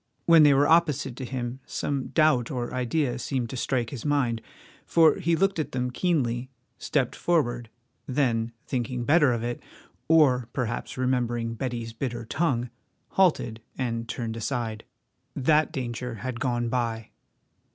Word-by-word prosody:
When 165 Hz, -1 st, +7 dB
they 145 Hz, -2 st, +7 dB
were 145 Hz, +2 st, +4 dB
opposite 150 Hz, -6 st, +3 dB
to 130 Hz, -, -5 dB
him 125 Hz, 0 st, -4 dB
some 140 Hz, -2 st, -2 dB
doubt 155 Hz, -7 st, +3 dB
or 125 Hz, -4 st, -3 dB
idea 125 Hz, +1 st, 0 dB
seemed 125 Hz, -3 st, -2 dB
to -, -, -5 dB
strike 120 Hz, -2 st, -1 dB
his 125 Hz, -5 st, -6 dB
mind, 130 Hz, -6 st, +1 dB, 0.4 s
for 165 Hz, -2 st, +4 dB
he 170 Hz, +1 st, +2 dB
looked 195 Hz, +1 st, +1 dB
at 155 Hz, -, -3 dB
them 125 Hz, -1 st, -1 dB
keenly, 130 Hz, -6 st, 0 dB, 0.3 s
stepped 135 Hz, -5 st, 0 dB
forward, 120 Hz, -9 st, 0 dB, 0.4 s
then, 120 Hz, -4 st, 0 dB
thinking 125 Hz, -1 st, -2 dB
better 150 Hz, 0 st, +4 dB
of 120 Hz, -1 st, -1 dB
it, 120 Hz, 0 st, -3 dB, 0.5 s
or 130 Hz, -7 st, +4 dB
perhaps 120 Hz, -2 st, -3 dB
remembering 120 Hz, -2 st, 0 dB
Betty's 115 Hz, -1 st, -4 dB
bitter 120 Hz, -1 st, -4 dB
tongue, 125 Hz, -4 st, -1 dB, 0.4 s
halted 135 Hz, -12 st, +2 dB, 0.2 s
and 115 Hz, -3 st, -2 dB
turned 115 Hz, -3 st, -3 dB
aside. 115 Hz, -1 st, -3 dB, 0.5 s
That 155 Hz, +4 st, +3 dB
danger 125 Hz, -4 st, -4 dB
had 120 Hz, +1 st, -5 dB
gone 120 Hz, -2 st, 0 dB
by! 115 Hz, -2 st, -2 dB
125 Hz, 145 wpm, -26 LUFS, 120-145 Hz, 0.5 s, When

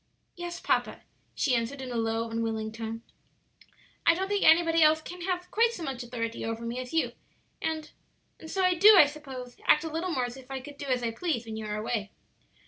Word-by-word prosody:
"Yes, 345 Hz, -1 st, -6 dB
papa," -, -, 0 dB, 0.3 s
she 270 Hz, -, +1 dB
answered, 240 Hz, +3 st, -1 dB
in 260 Hz, -1 st, -6 dB
a -, -, -4 dB
low, 225 Hz, 0 st, 0 dB
unwilling 225 Hz, -1 st, -2 dB
tone. 225 Hz, 0 st, -6 dB, 1.0 s
"I 335 Hz, -, +5 dB
don't 380 Hz, +2 st, -2 dB
think 405 Hz, 0 st, +1 dB
anybody 330 Hz, 0 st, +5 dB
else 310 Hz, 0 st, +6 dB
can 355 Hz, +3 st, -9 dB
have 360 Hz, 0 st, -3 dB
quite 460 Hz, +1 st, +3 dB
so 350 Hz, -, -6 dB
much 265 Hz, -4 st, -4 dB
authority 230 Hz, -1 st, -4 dB
over 225 Hz, +1 st, -4 dB
me 235 Hz, +2 st, -3 dB
as 255 Hz, -1 st, -6 dB
you, 325 Hz, -, +1 dB, 0.5 s
and 315 Hz, -1 st, -3 dB, 0.5 s
and 320 Hz, -, -10 dB
so 380 Hz, +2 st, 0 dB
I 365 Hz, 0 st, +4 dB
do, 405 Hz, +4 st, +8 dB
I 305 Hz, -, +10 dB
suppose, 270 Hz, -4 st, -8 dB
act 300 Hz, -, +6 dB
a 320 Hz, -, -4 dB
little 330 Hz, +4 st, -2 dB
more 255 Hz, -6 st, 0 dB
as 245 Hz, +1 st, -7 dB
if 260 Hz, -1 st, -14 dB
I 270 Hz, 0 st, -4 dB
could 285 Hz, +2 st, -11 dB
do 285 Hz, -, -5 dB
as 250 Hz, -2 st, 0 dB
I 230 Hz, -, 0 dB
please 240 Hz, -1 st, -2 dB
when 220 Hz, -1 st, -6 dB
you 220 Hz, -1 st, -5 dB
are 210 Hz, 0 st, -2 dB
away." 215 Hz, -1 st, -2 dB
270 Hz, 220 wpm, -28 LUFS, 230-330 Hz, 1.0 s, I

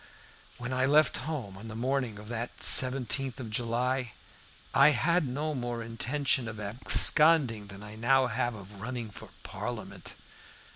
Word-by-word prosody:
When 125 Hz, +1 st, -4 dB
I 130 Hz, +1 st, +1 dB
left 150 Hz, 0 st, +4 dB
home 120 Hz, -12 st, -5 dB
on 110 Hz, -, -9 dB
the 110 Hz, -, -7 dB
morning 125 Hz, -2 st, -1 dB
of 105 Hz, +1 st, -11 dB
that 120 Hz, 0 st, -5 dB
17th 130 Hz, 0 st, +3 dB
of 115 Hz, -4 st, -7 dB
July, 120 Hz, +2 st, -1 dB, 0.6 s
I 140 Hz, +2 st, +7 dB
had 170 Hz, 0 st, +2 dB
no 150 Hz, +5 st, -2 dB
more 120 Hz, -3 st, -4 dB
intention 125 Hz, +2 st, -1 dB
of 110 Hz, -1 st, -7 dB
absconding 120 Hz, +2 st, +3 dB
than 100 Hz, 0 st, -11 dB
I 105 Hz, +1 st, -9 dB
now 130 Hz, +3 st, +3 dB
have 120 Hz, -1 st, -1 dB
of 100 Hz, -1 st, -12 dB
running 120 Hz, -1 st, -5 dB
for -, -, -12 dB
Parliament. -, -, -7 dB
125 Hz, 150 wpm, -29 LUFS, 110-135 Hz, 0.6 s, I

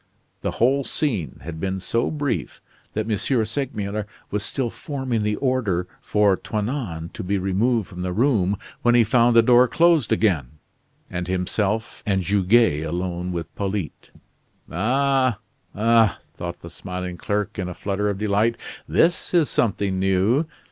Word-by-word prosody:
The -, -, -3 dB
whole 135 Hz, +4 st, +3 dB
scene 110 Hz, -, -2 dB
had 80 Hz, +1 st, -6 dB
been 95 Hz, +2 st, -2 dB
so 115 Hz, +5 st, 0 dB
brief 145 Hz, -3 st, -3 dB, 0.3 s
that 110 Hz, +1 st, -2 dB
M. 110 Hz, -, +1 dB, 0.3 s
Segmuller 105 Hz, -4 st, -3 dB, 0.2 s
was 105 Hz, -, -1 dB
still 120 Hz, +2 st, -1 dB
forming 130 Hz, -6 st, -3 dB
the 105 Hz, 0 st, 0 dB
order 105 Hz, -9 st, 0 dB
for 105 Hz, -2 st, +3 dB
Toinon 105 Hz, -, -3 dB
to -, -, -6 dB
be 100 Hz, +2 st, 0 dB
removed 100 Hz, +4 st, +1 dB
from 90 Hz, -, -8 dB
the 90 Hz, 0 st, -2 dB
room, 105 Hz, -3 st, +2 dB, 0.2 s
when 120 Hz, 0 st, +4 dB
he 120 Hz, -, +6 dB
found 120 Hz, +2 st, +3 dB
the 115 Hz, -, +7 dB
door 125 Hz, +1 st, +6 dB
closed 165 Hz, -2 st, +3 dB
again, 75 Hz, -, +1 dB, 0.5 s
and 90 Hz, -1 st, -4 dB
himself 100 Hz, +4 st, -1 dB
and 95 Hz, -2 st, 0 dB
Goguet 100 Hz, -3 st, +3 dB
alone 90 Hz, +2 st, -3 dB
with 85 Hz, -2 st, -5 dB
Polyte. 100 Hz, -4 st, -4 dB, 0.6 s
"Ah, 130 Hz, +4 st, +2 dB, 0.4 s
ah!" 115 Hz, 0 st, +4 dB, 0.2 s
thought 85 Hz, 0 st, -6 dB
the 85 Hz, -, -9 dB
smiling 90 Hz, 0 st, -5 dB
clerk, 105 Hz, +3 st, -2 dB
in 90 Hz, -1 st, -2 dB
a 90 Hz, -, -7 dB
flutter 105 Hz, +1 st, -1 dB
of 100 Hz, -, -2 dB
delight, 105 Hz, +3 st, +1 dB, 0.3 s
"this 175 Hz, +1 st, +2 dB
is 165 Hz, -4 st, +3 dB
something 100 Hz, -4 st, 0 dB
new." 95 Hz, -, +2 dB
105 Hz, 150 wpm, -23 LUFS, 90-120 Hz, 0.6 s, the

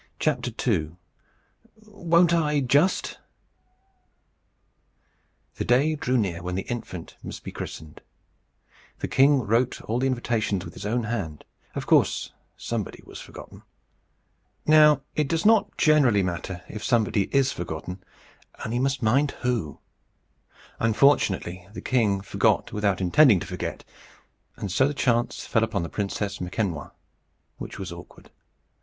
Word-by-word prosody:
II. 80 Hz, +2 st, -1 dB, 0.9 s
WON'T 175 Hz, -4 st, +2 dB
I, 150 Hz, -3 st, +2 dB
JUST? 140 Hz, +8 st, +1 dB, 2.4 s
The -, -, -1 dB
day 135 Hz, +6 st, +3 dB
drew 130 Hz, -4 st, 0 dB
near 90 Hz, -7 st, -1 dB
when 90 Hz, +1 st, -4 dB
the 95 Hz, -, -2 dB
infant 105 Hz, -8 st, -7 dB
must -, -, -8 dB
be -, -, -7 dB
christened. 80 Hz, -1 st, -8 dB, 1.0 s
The -, -, -3 dB
king 140 Hz, 0 st, +4 dB
wrote 115 Hz, +4 st, +1 dB
all 115 Hz, +3 st, -1 dB
the 135 Hz, -, +1 dB
invitations 115 Hz, -6 st, -1 dB
with -, -, -9 dB
his -, -, -6 dB
own 120 Hz, +2 st, 0 dB
hand. 100 Hz, -9 st, -4 dB, 0.3 s
Of -, -, -3 dB
course -, -, +2 dB, 0.2 s
somebody 115 Hz, -4 st, -4 dB
was -, -, -10 dB
forgotten. -, -, -12 dB, 1.0 s
Now 150 Hz, -2 st, +6 dB
it 150 Hz, -2 st, +1 dB
does 165 Hz, +4 st, -1 dB
not 220 Hz, -1 st, +4 dB
generally 135 Hz, -10 st, +4 dB
matter 90 Hz, 0 st, -4 dB
if 105 Hz, -, -7 dB
somebody 110 Hz, -4 st, +2 dB
is 135 Hz, -1 st, +2 dB
forgotten, 90 Hz, +2 st, -6 dB, 0.6 s
only 115 Hz, +2 st, -2 dB
you -, -, 0 dB
must 135 Hz, -1 st, 0 dB
mind 135 Hz, +7 st, +3 dB
who. 115 Hz, -, -1 dB, 1.0 s
Unfortunately, 105 Hz, -7 st, +2 dB
the -, -, -6 dB
king 105 Hz, -6 st, +1 dB
forgot 100 Hz, -, +1 dB
without 100 Hz, -2 st, 0 dB
intending 105 Hz, -, +5 dB
to -, -, -6 dB
forget; -, -, -5 dB, 0.7 s
and 100 Hz, -, -5 dB
so 130 Hz, +8 st, +3 dB
the 145 Hz, -, -3 dB
chance 120 Hz, -3 st, 0 dB
fell 110 Hz, -, +1 dB
upon 110 Hz, -5 st, -1 dB
the 85 Hz, -, -5 dB
Princess 100 Hz, 0 st, -3 dB
Makemnoit, 90 Hz, -2 st, -3 dB, 0.7 s
which -, -, -7 dB
was 95 Hz, -2 st, -6 dB
awkward. 85 Hz, +1 st, -12 dB
115 Hz, 135 wpm, -25 LUFS, 95-140 Hz, 2.4 s, Now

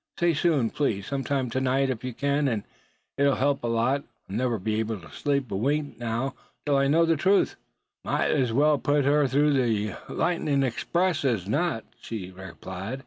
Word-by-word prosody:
Say 175 Hz, -1 st, +3 dB
soon, 145 Hz, -7 st, +2 dB
please; 105 Hz, -10 st, -1 dB
sometime 135 Hz, -2 st, -2 dB
to 130 Hz, -, -1 dB
night, 135 Hz, +1 st, +2 dB
if 120 Hz, -2 st, -5 dB
you 130 Hz, -, -3 dB
can; 140 Hz, +3 st, 0 dB
and 110 Hz, -5 st, -1 dB, 0.6 s
it'll 140 Hz, -1 st, +4 dB
help 140 Hz, 0 st, +1 dB
a -, -, 0 dB
lot. 120 Hz, +5 st, +1 dB, 0.2 s
I'll 95 Hz, -, -6 dB
never 120 Hz, 0 st, 0 dB
be 110 Hz, +2 st, -1 dB
able 110 Hz, -1 st, -2 dB
to 80 Hz, -4 st, -14 dB
sleep 140 Hz, -, -1 dB
a -, -, -1 dB
wink 145 Hz, +3 st, -1 dB
now 120 Hz, +3 st, -2 dB, 0.3 s
till 145 Hz, -1 st, +2 dB
I 140 Hz, 0 st, +3 dB
know 165 Hz, +4 st, +4 dB
the 165 Hz, 0 st, +3 dB
truth." 195 Hz, +6 st, +2 dB, 0.5 s
"Mout -, -, 0 dB
as 130 Hz, -6 st, +1 dB
well 145 Hz, +4 st, +3 dB
put 145 Hz, -1 st, +1 dB
her 145 Hz, 0 st, +4 dB
through 145 Hz, +4 st, +3 dB
on 140 Hz, -, +3 dB
ther 110 Hz, -5 st, 0 dB, 0.2 s
lightnin' 150 Hz, -5 st, +1 dB
express 170 Hz, +7 st, 0 dB
as 115 Hz, -9 st, 0 dB
not," 145 Hz, -1 st, 0 dB, 0.2 s
she 95 Hz, -5 st, -6 dB
replied. 95 Hz, +5 st, -7 dB
135 Hz, 195 wpm, -26 LUFS, 115-145 Hz, 0.6 s, it'll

